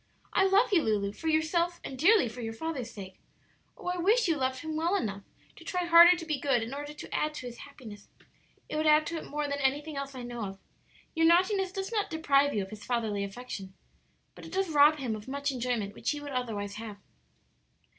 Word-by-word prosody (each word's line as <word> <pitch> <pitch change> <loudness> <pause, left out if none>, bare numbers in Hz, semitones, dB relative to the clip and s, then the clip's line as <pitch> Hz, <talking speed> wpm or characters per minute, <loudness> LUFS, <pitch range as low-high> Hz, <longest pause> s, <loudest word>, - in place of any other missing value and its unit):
I 385 - +4
love 405 +3 +3
you, 345 - +5
Lulu, 205 -4 0
for 320 +10 -7
yourself, 335 +2 +1
and 270 - -6
dearly 330 - +4
for 240 +2 -8
your 225 -1 -4
father's 275 -4 -4
sake. 190 -4 -10 0.6
Oh, - - -13
I 360 0 -1
wish 415 +6 +3
you 330 - +2
loved 260 -2 -1
him 315 -1 -5
well 335 +5 +1
enough 200 - -2 0.4
to - - -12
try 360 -1 -2
harder 345 +1 +8
to 335 - -7
be 305 -3 -2
good 260 -4 +1
in 230 +4 -6
order 290 +1 -5
to 300 - -10
add 305 0 0
to 255 - -7
his 240 -1 -8
happiness; 220 -8 -12 0.6
it - - -4
would 310 0 +1
add 305 0 +5
to 335 +2 -3
it - - -7
more 295 0 -2
than 285 0 -3
anything 285 +2 -1
else 275 0 -5
that - - -9
I - - -7
know 240 -2 -5
of. 195 0 -8 0.5
Your 325 -1 +3
naughtiness 370 +2 +3
does 390 +2 -4
not 425 -3 -1
deprive 285 -3 +2
you 205 -5 -1
of 190 - -10
his 215 -1 -9
fatherly 220 -5 -1
affection, 195 -2 -7 0.6
but - - -13
it - - -10
does 385 -1 0
rob 300 +1 +6
him 250 -6 -2
of 215 +1 -10
much 280 +1 -2
enjoyment 240 -5 -2
which - - -3
he 295 - -1
would 290 -1 -8
otherwise 210 -5 -3
have." 215 -2 -7
285 Hz, 230 wpm, -29 LUFS, 230-330 Hz, 0.6 s, harder